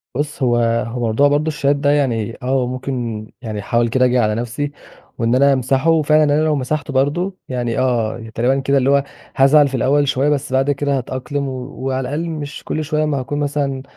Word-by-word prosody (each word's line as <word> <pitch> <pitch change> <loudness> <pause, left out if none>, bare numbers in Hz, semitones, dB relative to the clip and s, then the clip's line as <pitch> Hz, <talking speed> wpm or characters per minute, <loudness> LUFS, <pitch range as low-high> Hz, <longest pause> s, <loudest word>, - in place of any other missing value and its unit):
بُص 145 0 -3
هو 120 -2 +3 0.3
هو 120 +2 -5
موضوع 115 +6 +3
برضه 145 +2 +1
الشات 145 -2 +1
ده 145 0 0
يعني 120 -6 0
آه 130 0 +1
ممكن 125 -4 -4
يعني 110 -4 -5
أحاول 115 +3 +1
كده 130 +2 +3
أجي 125 0 +2
على 105 -2 +1
نفسي، 120 +5 -3 0.5
وإن 115 +1 +1
أنا 140 +1 +5
أمسحه 135 +5 +2
فعلًا 155 +1 +4
أنا 145 +1 +2
لو 155 -1 +2
مسحته 140 +1 -3
برضه 175 +8 0
يعني 120 -1 -2
آه 115 -3 -1
تقريبًا 130 +4 +2
كده، 140 +1 +1
اللي 135 0 +2
هو 140 0 +4 0.3
هازعل 140 +2 +5
في 135 - -4
الأول 140 +4 +2
شوية 135 +2 +1
بس 145 -2 -1
بعد 135 +2 +2
كده 140 0 0
هاتأقلم، 135 +3 -3
وعلى 130 0 -4
الأقل 150 +6 -3
مش 150 -2 -6
كل 155 - -3
شوية 155 0 0
أما 150 -2 0
هاكون 145 +3 -4
مثلًا 140 -2 -2
135 Hz, 200 wpm, -19 LUFS, 125-145 Hz, 0.5 s, أنا